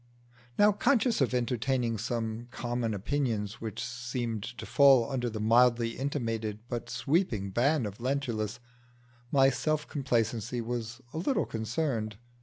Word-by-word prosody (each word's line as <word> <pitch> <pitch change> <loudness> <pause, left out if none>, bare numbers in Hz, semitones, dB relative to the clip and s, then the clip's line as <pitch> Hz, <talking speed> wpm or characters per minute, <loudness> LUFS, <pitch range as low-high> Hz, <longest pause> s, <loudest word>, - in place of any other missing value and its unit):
Now, 205 +1 +6
conscious 235 - +2
of 135 - +3
entertaining 125 -1 0
some 115 0 -3
common 120 0 -2
opinions 115 -1 -2
which 110 +1 -4
seemed 120 -2 -3 0.2
to - - -6
fall 135 -4 +6
under 125 -2 -1
the 110 -1 -5
mildly 115 +1 +4
intimated 115 -6 -2
but 120 -2 -4
sweeping 120 - 0
ban 130 +5 +2
of 100 -1 -6
Lentulus, 120 -4 -2 0.7
my 135 -1 +5
self 155 +3 -1
complacency 120 -4 -1
was 120 +1 -4
a 160 - -3
little 265 - +1
concerned. 110 -1 -2
120 Hz, 130 wpm, -30 LUFS, 110-135 Hz, 0.7 s, Now